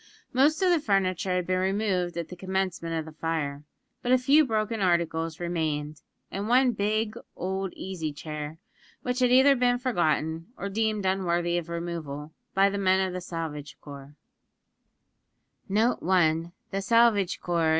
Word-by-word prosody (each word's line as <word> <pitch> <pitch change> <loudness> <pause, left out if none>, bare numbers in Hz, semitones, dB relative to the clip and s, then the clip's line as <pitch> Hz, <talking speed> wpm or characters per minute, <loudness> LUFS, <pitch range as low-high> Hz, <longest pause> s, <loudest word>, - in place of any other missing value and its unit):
Most 295 +8 +3
of 365 - +4
the 345 - +4
furniture 195 - 0
had 180 -1 0
been 185 0 0
removed 190 -2 0
at 170 -2 -4
the 180 - -7
commencement 185 -2 -2
of 160 -1 -2
the 160 - -9
fire; 155 -3 -3 0.4
but 245 - -1
a 255 - +7
few 275 +5 +5
broken 220 -1 -1
articles 165 -3 0
remained, 155 -4 -2 0.3
and 200 +2 -3
one 250 +1 +5
big 215 0 -1 0.2
old 190 +1 -3
easy 175 -5 -4
chair, 150 +1 -6 0.5
which 250 +1 -1
had 250 -1 +4
either 265 +2 +7
been 245 -1 +2
forgotten, 165 - 0
or 200 - -4
deemed 215 0 0
unworthy 175 -2 +1
of 170 -1 -9
removal, 160 -3 -5 0.2
by 195 +1 +5
the 200 0 -2
men 190 -1 +3
of 190 -1 0
the 180 - -4
Salvage 160 -4 -6
Corps. 140 0 -11
185 Hz, 140 wpm, -27 LUFS, 165-215 Hz, 0.5 s, a